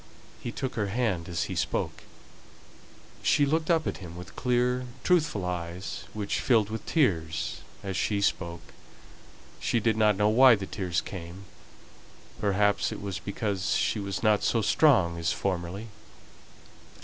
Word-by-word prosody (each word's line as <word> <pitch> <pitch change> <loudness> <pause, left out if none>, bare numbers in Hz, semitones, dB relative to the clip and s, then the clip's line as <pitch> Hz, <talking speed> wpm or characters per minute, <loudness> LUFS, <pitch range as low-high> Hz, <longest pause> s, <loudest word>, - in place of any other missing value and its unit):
He 120 - -5
took 130 +1 -4
her 105 -3 -1
hand 100 -6 -1
as 85 -1 -1
he 95 - -4
spoke. 80 -2 -2 1.2
She 145 - +4
looked 160 +3 0
up 165 -2 +3
at - - -2
him 85 -3 -9
with 90 +1 -10
clear, 125 0 +1 0.2
truthful 150 - +2
eyes, 90 +1 -4
which 105 -2 -2
filled 110 -4 +3
with 110 -1 -5
tears 80 - 0 0.2
as 95 -1 -3
she 100 +2 0
spoke. 85 -4 -2 0.9
She 120 - +1
did 110 0 +2
not 105 -2 +4
know 105 +1 +3
why 125 +2 +7
the 100 -2 -5
tears 90 -4 -2
came; 90 +1 -8 0.9
perhaps 100 0 +2
it - - -5
was 100 -2 -4
because 100 -1 -2
she 110 - +1
was 100 -3 -4
not 105 -1 +4
so 115 -2 +1
strong 100 - +4
as 85 0 0
formerly. 95 +3 -3
100 Hz, 150 wpm, -28 LUFS, 90-115 Hz, 1.2 s, why